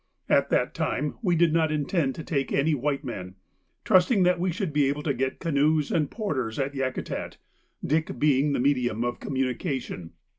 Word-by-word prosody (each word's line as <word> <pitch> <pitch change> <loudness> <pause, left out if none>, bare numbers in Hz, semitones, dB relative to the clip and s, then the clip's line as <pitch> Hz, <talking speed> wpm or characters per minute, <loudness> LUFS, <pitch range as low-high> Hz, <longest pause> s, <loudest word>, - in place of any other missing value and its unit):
At - - +3
that - - +1
time 150 +3 -1
we 180 -6 +2
did 165 -1 +3
not 160 -2 +2
intend 150 -2 0
to 160 - -6
take 140 -4 -2
any 150 +3 +2
white 145 +1 -1
men, 95 -8 -6 0.5
trusting 185 +2 +4
that 180 0 +3
we 180 +1 0
should 185 -3 -3
be 145 -2 +3
able 145 +1 -2
to 145 - 0
get 130 +1 -2
canoes 155 -2 +1
and 150 -4 +1
porters 135 - -3
at 140 0 -1
Yakutat, 130 -2 -3 0.5
Dick 155 -2 0
being 145 +1 +3
the - - 0
medium 125 -4 +1
of 120 0 -2
communication. 130 - -3
145 Hz, 180 wpm, -26 LUFS, 130-160 Hz, 0.5 s, trusting